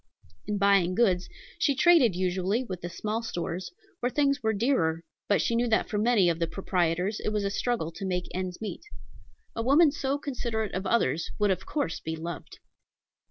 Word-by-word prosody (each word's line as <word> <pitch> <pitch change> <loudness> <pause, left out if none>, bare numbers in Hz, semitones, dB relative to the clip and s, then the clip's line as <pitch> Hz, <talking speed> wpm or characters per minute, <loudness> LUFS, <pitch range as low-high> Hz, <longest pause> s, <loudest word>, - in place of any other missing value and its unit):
In 210 -1 -1
buying 195 -3 +3
goods 185 -6 +2 0.3
she 280 - +2
traded 275 - +5
usually 185 +5 0
with 185 -7 -6
the 175 - -5
small 215 +5 -3
stores, 180 -4 -4 0.3
where 245 - 0
things 280 -1 +1
were 220 -1 +1
dearer, 195 - +1 0.2
but 205 - +2
she - - 0
knew 240 +1 +2
that 220 -1 +1
for 210 - 0
many 215 -4 +4
of 170 -1 +1
the 165 - 0
proprietors 180 +2 -1
it - - -2
was 210 -1 -1
a 200 - -1
struggle 225 -6 -1
to 195 - -9
make 180 -1 -1
ends 185 -1 -4
meet. 215 -2 -5 0.7
A 230 - -2
woman 285 +6 +5
so 275 -1 -1
considerate 235 -7 -3
of 190 +1 -3
others 170 -8 +1
would 205 -2 +2
of 185 0 -3
course 285 - -2
be 160 0 -4
loved. 165 +1 -7
200 Hz, 190 wpm, -28 LUFS, 180-240 Hz, 0.7 s, traded